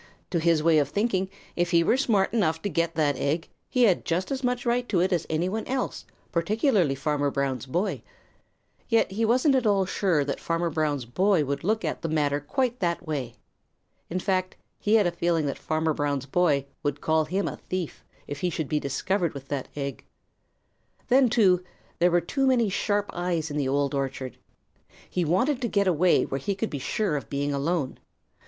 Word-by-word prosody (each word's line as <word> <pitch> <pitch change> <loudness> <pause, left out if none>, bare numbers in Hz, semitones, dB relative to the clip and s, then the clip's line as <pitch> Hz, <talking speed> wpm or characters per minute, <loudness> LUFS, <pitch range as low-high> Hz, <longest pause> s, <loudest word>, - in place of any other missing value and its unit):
To 170 - +1
his 165 -1 +2
way 165 -1 +5
of 145 -2 0
thinking, 195 -1 0 0.3
if 175 0 +1
he 170 0 +4
were 200 - +3
smart 225 -7 +2
enough 165 -8 +1
to 205 - 0
get 170 -2 0
that 150 -3 +2
egg, 155 +4 -1 0.2
he 250 - +2
had 195 -7 +4
just 180 +6 -1
as 270 -1 -2
much 250 0 0
right 240 +1 0
to 185 - +2
it 185 +2 +2
as 170 -2 -1
any 160 +3 0
one 220 +4 -2
else, 260 -1 -2 0.3
particularly 185 - +2
Farmer 145 0 0
Brown's 135 -3 -2
boy. 175 +10 -1 0.9
Yet 230 -4 +3
he 225 +4 0
wasn't 255 +5 +3
at 255 -4 +2
all 195 -2 +3
sure 180 -6 +1
that 140 - -3
Farmer 170 0 -1
Brown's 150 -4 -1
boy 180 - +2
would 140 +3 -3
look 220 +4 0
at - - -3
the 165 - -2
matter 145 -2 +1
quite 250 - -1
that 170 -1 -1
way. 140 -7 -3 0.7
In 180 - -1
fact, 185 0 -1 0.2
he 210 +1 +2
had 210 -3 +5
a 175 - +2
feeling 170 -2 0
that 140 - -3
Farmer 160 0 0
Brown's 145 -2 -1
boy 145 -2 +2 0.2
would 145 -1 -2
call 160 0 +2
him 190 +5 -1
a - - -4
thief 185 -4 -5 0.2
if 145 - -6
he 180 - 0
should 160 -3 -3
be 150 - +1
discovered 170 +5 -1
with 135 -1 -9
that 140 -3 -3
egg. 140 -1 -4 1.1
Then, 255 0 +5
too, 190 -6 +4 0.4
there 175 +1 +5
were 175 0 +3
too 270 +10 0
many 240 -5 +3
sharp 205 +1 0
eyes 170 -3 -2
in 145 - -3
the 140 -3 0
Old 140 0 +1
Orchard. 135 -2 -3 0.7
He 180 - -1
wanted 240 - +1
to 240 - 0
get 200 -2 +1
away 180 -1 +4
where 135 - -3
he 195 +9 -2
could 215 +3 -3
be 145 - -3
sure 195 +4 -1
of 140 -6 -5
being 145 +1 -1
alone. 140 0 -1
170 Hz, 200 wpm, -26 LUFS, 145-205 Hz, 1.1 s, way